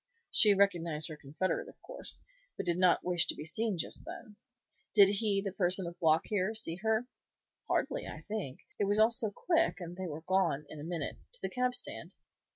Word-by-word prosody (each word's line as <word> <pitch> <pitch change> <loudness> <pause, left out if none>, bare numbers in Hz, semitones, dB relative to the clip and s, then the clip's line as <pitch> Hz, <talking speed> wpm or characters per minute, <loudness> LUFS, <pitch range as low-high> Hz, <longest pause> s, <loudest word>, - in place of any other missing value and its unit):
"She 210 -2 +6
recognized 170 -6 +1
her 155 - -6
confederate, 150 +6 -3
of - - -17
course, - - -6 0.3
but - - -3
did 175 0 0
not 180 -1 +4
wish 175 -1 +2
to - - 0
be 150 - -7
seen 215 +4 0
just - - -2
then. 215 -3 -9 0.6
Did 200 -2 +8
he, 200 -1 +1
the 195 - -1
person 185 0 +2
with 170 +1 -7
Block 160 -1 +4
here, 210 +1 -1
see 170 -6 -1
her?" 220 +3 +1 0.6
"Hardly, - - -1
I - - -8
think; 205 -12 -5 0.2
it 205 - +2
was 205 +1 +1
all 220 +2 +5
so 230 -2 0
quick, 330 - +1
and 175 -1 -7
they 185 0 -4
were 155 0 -6
gone, 175 -6 +1
in 155 - -9
a - - -7
minute, 165 -3 -4 0.2
to - - -14
the 190 - -2
cab 250 +2 +1
stand." - - -2
190 Hz, 205 wpm, -32 LUFS, 170-215 Hz, 0.6 s, Did